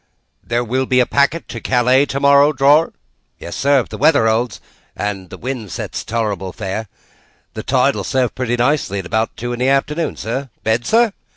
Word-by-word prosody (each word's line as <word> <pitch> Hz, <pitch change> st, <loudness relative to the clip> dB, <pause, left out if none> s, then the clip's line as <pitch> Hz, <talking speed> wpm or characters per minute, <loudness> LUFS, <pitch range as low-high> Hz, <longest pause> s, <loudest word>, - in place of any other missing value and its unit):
"There 120 Hz, +1 st, -1 dB
will 130 Hz, +3 st, -1 dB
be 125 Hz, -, +3 dB
a 125 Hz, -, +4 dB
packet 140 Hz, +6 st, +1 dB
to 115 Hz, -, -6 dB
Calais, 130 Hz, +4 st, +3 dB
tomorrow, 140 Hz, +2 st, +4 dB
drawer?" 145 Hz, +4 st, +4 dB, 0.5 s
"Yes, 85 Hz, -, -8 dB
sir, 140 Hz, -1 st, +3 dB
if -, -, -10 dB
the -, -, -8 dB
weather 145 Hz, -5 st, +4 dB
holds 115 Hz, +2 st, 0 dB, 0.4 s
and 100 Hz, -3 st, -4 dB
the -, -, -9 dB
wind 120 Hz, -6 st, -5 dB
sets -, -, -5 dB
tolerable 105 Hz, -5 st, -2 dB
fair. 100 Hz, +5 st, -5 dB, 0.7 s
The -, -, -5 dB
tide -, -, +2 dB
will -, -, -3 dB
serve 130 Hz, -2 st, 0 dB
pretty 120 Hz, -1 st, -2 dB
nicely 125 Hz, -5 st, 0 dB
at 95 Hz, -, -4 dB
about 110 Hz, +4 st, -1 dB
two 120 Hz, +1 st, -4 dB
in 120 Hz, -, -5 dB
the 130 Hz, +1 st, +2 dB
afternoon, 150 Hz, +4 st, 0 dB
sir. 130 Hz, +4 st, -4 dB
Bed, 110 Hz, +2 st, 0 dB
sir?" 230 Hz, -2 st, +3 dB
125 Hz, 190 wpm, -18 LUFS, 110-140 Hz, 0.7 s, a